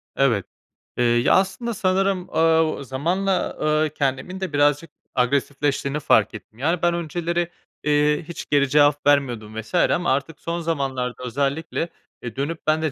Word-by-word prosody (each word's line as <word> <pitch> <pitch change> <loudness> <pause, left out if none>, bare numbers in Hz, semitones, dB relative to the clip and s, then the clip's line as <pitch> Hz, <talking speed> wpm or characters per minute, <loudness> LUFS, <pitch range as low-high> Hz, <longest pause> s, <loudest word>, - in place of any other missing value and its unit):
Evet. 115 -9 +2 0.5
Eee, 120 - +2
ya, 120 0 +3
aslında 210 +5 0
sanırım, 185 -1 0
aaa, 160 -3 +2
zamanla, 170 +9 -1 0.3
aaa, 155 0 +2
kendimin 140 +5 -2
de 190 -5 -4
birazcık 145 +2 +2 0.3
agresifleştiğini 140 +2 0
fark - - +3
ettim. 110 - -11
Yani, 165 +5 0
ben 175 0 +3
önceleri, 170 +1 -2 0.3
eee, 150 +1 +2
hiç 170 - -7
geri 140 -2 +3
cevap 145 +1 +3
vermiyordum 120 -7 +1
vs. 110 - -17
ama 175 -3 +2
artık 140 +4 -3
son 170 +1 -3
zamanlarda 135 -6 -2
özellikle, 140 +6 -2 0.3
eee, 115 -3 -6
dönüp 150 +4 -3
ben 155 +1 +3
de 155 -2 0
150 Hz, 150 wpm, -23 LUFS, 135-170 Hz, 0.5 s, ya